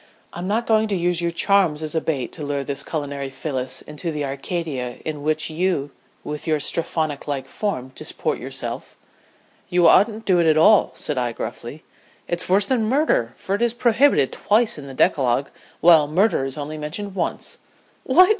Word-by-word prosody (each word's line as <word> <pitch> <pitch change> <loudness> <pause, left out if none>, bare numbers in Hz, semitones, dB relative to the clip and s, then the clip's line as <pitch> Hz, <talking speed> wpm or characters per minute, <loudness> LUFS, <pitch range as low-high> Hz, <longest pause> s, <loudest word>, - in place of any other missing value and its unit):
"I'm 175 +1 -5
not 225 +4 0
going 220 -1 +3
to 205 - -1
use 175 -1 0
your 170 - 0
charms 170 -3 +2
as 155 - -4
a 160 - 0
bait 140 -6 -2
to 155 - -7
lure 140 -1 -2
this 140 0 -3
culinary 140 -3 -4
Phyllis 130 -2 -3
into 165 +3 -5
the 150 -2 -2
Arcadia 140 -3 -4
in 150 -2 -4
which 155 +1 0
you 160 -4 0 0.3
with 150 +2 -6
your 155 -1 +2
Strephonlike 145 -3 -2
form 130 -12 -3
disport - - -3
yourself." - - -6 0.7
"You 175 -1 +4
oughtn't 220 +3 +4
to 190 - +3
do 175 - +4
it 170 - +3
at 155 - +4
all," 205 +6 +5
said 150 -4 -1
I, 120 -1 -1
gruffly. 120 +7 -7 0.4
"It's 175 +1 -2
worse 195 +2 +4
than 240 -3 +1
murder, 255 - +2
for 195 - -4
it 205 - 0
is 235 -1 +2
prohibited 240 - +3
twice 215 -4 +1
in 140 - -9
the 135 - -9
decalogue, 130 0 +2 0.3
while 160 -3 +6
murder 175 -2 +2
is 135 +1 -5
only 150 +1 -5
mentioned 185 +7 -5
once." 180 -3 -3 0.4
"What!" 365 0 +6
160 Hz, 185 wpm, -22 LUFS, 140-195 Hz, 0.7 s, while